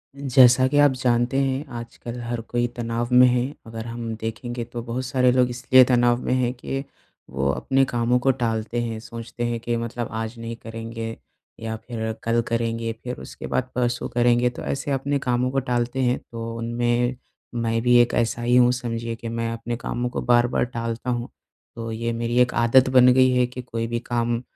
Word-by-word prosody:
जैसा 130 -2 +5
कि 145 - 0
आप 145 -1 +6
जानते 125 0 +1
हैं 135 +2 -1
आजकल 120 +1 -8
हर 120 0 -3
कोई 120 +1 -1
तनाव 115 0 -2
में 125 +1 +8
है। 125 0 +2 0.2
अगर 115 0 -7
हम 115 -1 -5
देखेंगे 115 +2 -5
तो 120 0 -6
बहुत 120 +2 -4
सारे 125 0 +3
लोग 125 0 +3
इसलिए 125 +1 +5
तनाव 120 -1 +3
में - - +1
हैं 125 -1 +1
के 135 +2 -4 0.5
वो 70 +1 -1
अपने 135 - +1
कामों 120 0 +1
को 135 +2 +3
टालते 115 -2 -2
हैं 115 -2 -3
सोचते 115 +1 -7
हैं 120 -1 -2
कि 120 +1 -2
मतलब 115 0 -4
आज 110 +2 -5
नहीं 115 0 -5
करेंगे 115 0 -6 0.4
या 110 0 -4
फिर 110 -2 -3
कल 115 +1 +2
करेंगे 115 -1 -1
फिर 125 0 -5
उसके - - -8
बाद 130 0 -1
परसों 120 -1 -1
करेंगे 120 0 +3
तो 125 - -9
ऐसे 140 +1 -3
अपने 140 +1 0
कामों 125 0 0
को 135 - +1
टालते 125 0 -1
हैं। 125 0 +1
तो 115 0 -5
उनमें 120 +1 0 0.4
मैं 115 -1 0
भी 120 0 +5
एक 120 - +1
ऐसा 120 0 0
ही 120 +1 +2
हूँ 125 0 +6
समझिए 115 -2 -3
कि 115 +1 -8
मैं 115 0 -2
अपने 115 +1 -4
कामों 120 0 -3
को - - -4
बार-बार 120 0 +3
टालता 115 0 -4
हूँ। 120 -1 -2 0.5
तो 115 -1 -5
ये 115 +1 -2
मेरी 115 +1 -2
एक 125 - +2
आदत 120 +3 +4
बन 130 -1 +6
गई 130 0 +5
है 125 0 +3
कि 125 0 -7
कोई 115 -2 -4
भी 120 0 -2
काम 120 0 0
120 Hz, 200 wpm, -23 LUFS, 115-125 Hz, 0.5 s, में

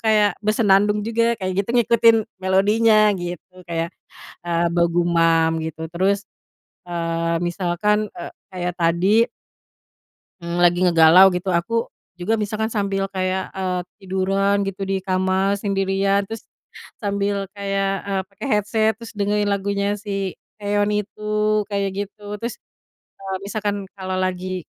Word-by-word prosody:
kayak 215 -2 +3
bersenandung 210 -1 +3
juga 230 +1 +1
kayak 185 -2 -3
gitu, 200 - -6
ngikutin 230 -1 +5 0.2
melodinya 210 +3 +4
gitu, 180 0 -7
kayak, 165 +1 -2 0.5
eee, 170 0 +1
bergumam 170 -1 +2
gitu. 160 0 -5
Terus, 195 +4 +1 0.6
eee, 165 -1 -2
misalkan, 180 +4 0
eee, 170 - -8 0.2
kayak 180 -1 -3
tadi 185 +7 +3 1.1
ng 170 0 -4
lagi 175 0 +4
ngegalau 175 +1 +7
gitu, 185 +1 -2
aku 230 +7 0 0.3
juga 180 +5 -2
misalkan 215 +2 -2
sambil 200 -2 -1
kayak, 185 0 -2
eee, 185 -2 -2 0.2
tiduran 195 +1 +1
gitu 195 0 -4
di 195 - +1
kamar 190 +1 +1
sendirian, 195 0 +1
terus 225 +2 -9 0.5
sambil 200 -1 -1
kayak, 195 -1 -1 0.2
eee, 195 -1 0
pakai 200 +7 -8
headset, 215 0 +2
terus 230 0 -10
dengerin 205 0 0
lagunya 200 +1 -1
si 195 -3 -3 0.2
Taeyeon 205 0 0 0.2
itu 210 +2 -9 0.4
kayak 200 -1 -1
gitu. 205 +1 -6
Terus, 235 0 -4 0.6
eee, 195 -1 -5
misalkan 205 -1 -3
kalau 185 -1 -4
lagi, 185 0 -2
195 Hz, 125 wpm, -21 LUFS, 180-205 Hz, 1.1 s, ngegalau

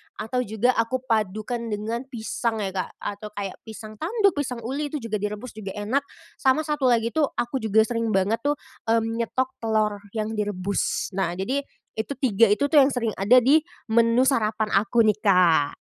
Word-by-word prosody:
atau 250 +3 -3
juga 220 +4 +2
aku 255 +3 0
padukan 215 +1 -1
dengan 225 +4 -3
pisang 225 -2 -3
ya, 190 - -2
Kak, 185 -1 -3
atau 205 +1 -5
kayak 200 -1 -5
pisang 215 -1 -10
tanduk, 400 +3 +2
pisang 250 -4 -3
uli 280 +5 -2
itu 290 -4 -5
juga 215 -2 -2
direbus 210 +4 -4
juga 205 -3 -7
enak, 245 +8 -1 0.3
sama 270 +4 +3
satu 295 -4 0
lagi 230 -1 +2
tuh 305 -3 +2
aku 240 +2 -2
juga 220 -1 +3
sering 230 -2 -1
banget 200 +4 +1
tuh, 290 +3 0 0.3
mmm, 225 0 +1
nyetok 260 +3 -2
telor 215 -2 0 0.2
yang 215 0 -2
direbus. 200 -3 -2
Nah, 175 -2 0
jadi 250 +10 -1 0.4
itu 255 +6 -2
3 230 -4 +4
itu 210 +7 +2
tuh 300 - +7
yang 270 - +4
sering 235 -4 -1
ada 210 +6 +5
di 290 +5 +6 0.3
menu 230 +2 +4
sarapan 220 -5 +1
aku 215 +4 +3
nih, 215 -1 +2
Kak. 180 -8 +4
225 Hz, 180 wpm, -24 LUFS, 210-255 Hz, 0.4 s, tuh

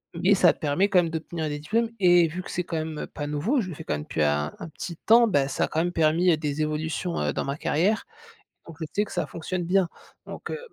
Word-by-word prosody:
Mais 180 +4 +3
ça 185 -3 +5
permet 175 +6 +1
quand 190 - +5
même 165 - -3
d'obtenir 160 0 -4
des 145 0 -4
diplômes 225 +9 0
et 175 -2 +6
vu 170 +4 -5
que - - -10
c'est 180 - -2
quand 170 -1 -4
même 155 -1 -5
pas 145 -1 -4
nouveau, 175 - 0
je 190 - -4
le 170 - -6
fais 160 - -8
quand - - -2
même 75 - -3
depuis 80 - -1
un 75 +1 0
un - - -8
petit 170 +2 -7
temps, 230 +5 +5
bah 145 -9 +2
ça 135 - 0
a - - -6
quand 160 - -2
même 175 +2 +1
permis, 165 +2 +3
heu, 160 - +3
des 150 -1 -2
évolutions, 155 +3 -2
heu, 75 -1 0
dans - - -2
ma 140 +1 -3
carrière. 185 +7 +1 0.6
Donc 165 - -11
je - - -1
sais 210 +1 +1
que - - -13
ça - - -1
fonctionne 175 +2 -4
bien. 185 +1 +2 0.4
Donc, - - -7
heu, - - -3
165 Hz, 270 wpm, -26 LUFS, 150-185 Hz, 0.6 s, et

